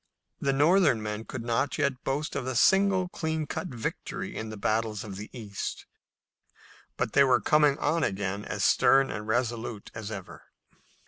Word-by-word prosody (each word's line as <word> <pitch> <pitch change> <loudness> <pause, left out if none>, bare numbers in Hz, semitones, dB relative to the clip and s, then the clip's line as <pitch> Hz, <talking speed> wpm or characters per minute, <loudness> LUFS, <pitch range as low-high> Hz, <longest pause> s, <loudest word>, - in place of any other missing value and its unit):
The 140 - +1
Northern 145 - +4
men 105 +1 -4
could 130 -3 -6
not 120 +4 0
yet 135 -3 -1
boast 145 +3 -2
of 135 -2 -3
a 130 - -2
single 190 +5 +4
clean 160 -3 -2
cut 185 - -4
victory 120 -8 -5
in 110 - -5
the 110 - -7
battles 110 0 -1
of 100 -3 -7
the 105 +2 -7
east, 105 -5 -6 1.1
but - - -1
they 140 - +6
were 130 -3 +4
coming 150 +4 +3
on 160 +2 +1
again 100 0 -2
as - - -3
stern 135 0 +4
and 105 0 -5
resolute 115 -2 -2
as 110 -2 -6
ever. 100 -5 -8
120 Hz, 170 wpm, -28 LUFS, 110-145 Hz, 1.1 s, they